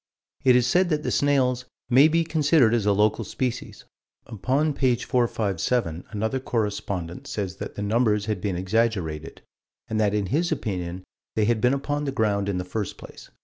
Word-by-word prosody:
It 130 -2 +6
is 125 -1 +4
said 175 +8 +3
that 150 -2 0
the - - -1
snails 130 -3 +2 0.2
"may 135 +5 +6
be 165 +1 +2
considered 150 -7 +3
as 110 -3 +1
a - - +5
local 105 +3 +2
species." 125 +4 -4 0.4
Upon 135 +7 0
page 130 -4 +1
457, 110 -6 0
another 110 +4 -2
correspondent 100 -8 -3
says 95 -3 -4
that - - -7
the 105 - -4
numbers 105 -1 +1
had 105 -4 -2
been 100 -3 -1
exaggerated, 90 -5 -1 0.4
and 110 - -2
that 105 -1 +2
in 105 -1 0
his 170 +3 +1
opinion 90 - -3 0.3
they 110 - +2
had 115 -1 +1
been 125 +2 +3
upon 145 +1 -2
the 140 - -1
ground 100 -5 0
in 95 - -1
the 90 - -3
first 100 +2 -4
place. - - -12
110 Hz, 180 wpm, -25 LUFS, 100-130 Hz, 0.4 s, It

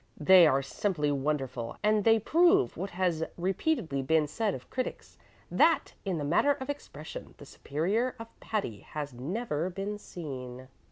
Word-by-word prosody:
They 175 +2 +7
are 135 -2 +2
simply 150 0 -1
wonderful, 135 -4 -2
and 210 0 +3
they 225 +1 +6
prove 350 - +3
what 195 +2 -4
has 175 -3 0
repeatedly 180 - 0
been 155 +3 +2
said 210 +6 -1
by - - -22
critics, 255 -1 -5 0.3
that, - - +3
in 190 -3 -1
the 150 - -3
matter 175 - +3
of 275 0 -4
expression, 290 - -9
the - - -12
superior 200 - -1
of 230 -1 -8
Patti 195 - -3
has 145 -3 -6
never 165 - -2
been 195 +3 -4
seen." 130 -8 -8
180 Hz, 155 wpm, -29 LUFS, 145-220 Hz, 0.3 s, They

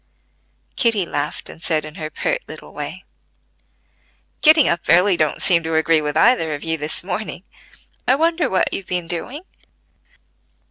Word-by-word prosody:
Kitty 225 -6 +2
laughed, 145 -2 -4
and - - -11
said 155 -3 0
in 155 - -9
her 155 -1 -6
pert - - -2
little - - -11
way: - - -6 1.4
"Getting 310 -1 +6
up 175 - +1
early 180 +4 +5
don't 155 -3 0
seem 170 -3 +5
to 160 0 -3
agree 160 0 +3
with 150 0 -2
either 165 -7 +3
of 145 - -9
you 160 0 -1
this 155 +1 -4
morning: 185 0 -5 0.6
I 255 - +5
wonder 325 -1 +1
what 190 - +1
you've 195 - -4
been 180 -1 -2
doing?" 180 - -5
175 Hz, 155 wpm, -20 LUFS, 160-230 Hz, 1.4 s, Getting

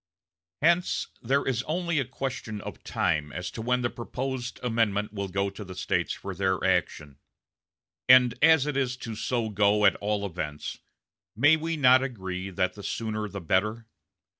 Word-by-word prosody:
Hence 170 +2 +2
there 135 +4 +1
is 125 -2 0
only 170 0 0
a 135 - 0
question 130 -4 -5
of - - -9
time 75 -1 0
as 90 +3 -5
to 115 - -6
when 125 +2 0
the 120 - +1
proposed 125 +1 -5
amendment 110 -3 0
will 100 -1 -3
go 100 +1 -1
to 100 +2 -8
the 95 -2 -9
States - - -1
for 100 - -5
their 95 0 0
action. 70 -2 0 0.9
And 125 -2 +8
as 160 -3 +6
it 150 -2 -2
is 125 -2 0
to 115 -2 -6
so 115 +1 -1
go 105 0 +3
at 95 - +5
all 105 0 -1
events, 80 -5 -5 0.6
may 145 +8 +6
we 165 +1 -3
not 130 -2 +6
agree 95 -7 -4
that 95 -1 -1
the 105 - -10
sooner 110 0 -3
the 100 0 -6
better? 105 +7 0
110 Hz, 170 wpm, -27 LUFS, 100-130 Hz, 0.9 s, And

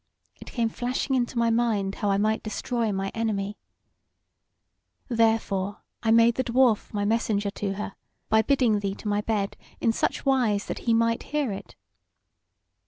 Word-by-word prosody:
it - - -13
came 235 -2 +1
flashing 250 +4 -1
into 245 -1 -1
my 235 0 +3
mind 220 -4 +1
how 205 - -1
I 195 - +3
might 215 +2 +1
destroy 225 +1 -2
my 195 0 -2
enemy. 210 -2 -2 1.5
Therefore 220 -4 +1 0.2
I 225 - 0
made 230 +1 +6
the 260 - -1
Dwarf 240 -3 +2
my 205 -1 -1
messenger 210 -2 +1
to 200 -1 -3
her, 200 0 -5 0.3
by 220 0 +4
bidding 245 -4 +2
thee 200 -1 -2
to 215 - -8
my 205 0 +1
bed 210 -2 -1 0.2
in 230 - +2
such 225 - -1
wise 240 -7 +2
that - - -4
he - - +5
might 230 0 +2
hear 295 -5 -1
it. 195 - -8
225 Hz, 165 wpm, -26 LUFS, 205-235 Hz, 1.5 s, made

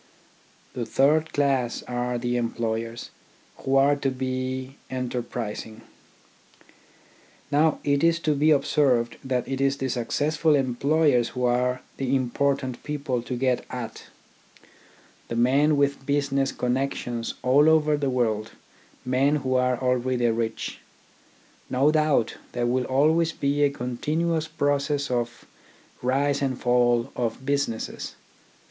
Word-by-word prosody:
The 120 - -3
third 150 +7 +2
class 135 -4 0
are 125 0 -2
the 120 0 -1
employers, 115 -1 -3 0.5
who 135 - -1
are 140 +1 +5
to 140 -1 0
be 130 +1 -3
enterprising. 120 -3 -4 1.7
Now 150 +1 +3
it 140 0 +1
is 165 0 +4
to 155 - +1
be 150 +2 +2
observed 135 -5 +2
that 130 -2 -1
it 135 0 -3
is 135 0 +2
the 135 -1 -2
successful 150 +6 +1
employers 135 0 +2
who 125 0 -2
are 125 +1 +1
the 135 0 +1
impor 135 +2 +1
tant 130 -3 -6
people 140 -4 -2
to 125 +2 -5
get 125 0 0
at, 120 -3 -6 1.2
the 115 - -4
men 140 +6 +3
with 140 -1 +1
business 140 -1 0
connections 125 -2 -2
all 140 +5 +5
over 155 -1 +4
the 145 -2 -1
world, 115 -4 -1 0.5
men 135 +3 +2
who 130 -3 -1
are 125 -1 +2
already 125 -1 +1
rich. 115 0 -3 0.9
No 135 +4 +3
doubt 155 -7 +1 0.2
there 120 -1 -1
will 125 +1 +1
always 160 +5 +2
be 140 +1 0
a 145 - +5
continuous 155 +6 -2
process 145 -1 0
of 120 -1 -2 0.6
rise 140 +3 +1
and 130 -2 -1
fall 120 0 +2
of 120 +2 -3
businesses. 140 -5 -2
130 Hz, 130 wpm, -25 LUFS, 120-145 Hz, 1.7 s, are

